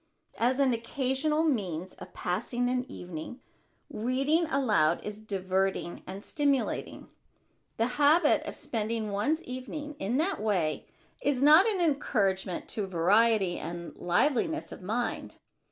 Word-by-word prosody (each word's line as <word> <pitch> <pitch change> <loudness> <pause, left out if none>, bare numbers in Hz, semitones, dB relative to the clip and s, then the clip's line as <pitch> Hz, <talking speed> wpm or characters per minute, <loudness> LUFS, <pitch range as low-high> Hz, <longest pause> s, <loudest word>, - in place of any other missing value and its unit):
As 250 +3 +2
an 270 -3 +4
occasional 270 +6 0
means 190 - -1
of - - -12
passing 240 +7 -1
an 250 0 -2
evening, 175 +8 -7 0.5
reading 275 +9 0
aloud 215 - +2
is 210 0 -6
diverting 190 -3 -2
and 195 +3 -7
stimulating. 285 -3 -1 0.7
The 225 - +2 0.2
habit 300 +2 +5
of - - -5
spending 220 -1 -3
one's 290 +12 0
evenings 290 +4 -6
in 220 +7 -1
that 340 - 0
way 185 -8 0 0.3
is 275 -2 +1
not 310 +8 +8
an 415 -4 0
encouragement 200 - 0
to 205 -3 -3
variety 190 +2 +3
and 170 +1 -6
liveliness 285 - 0
of - - -9
mind. 225 +6 -3
230 Hz, 125 wpm, -29 LUFS, 190-285 Hz, 0.7 s, not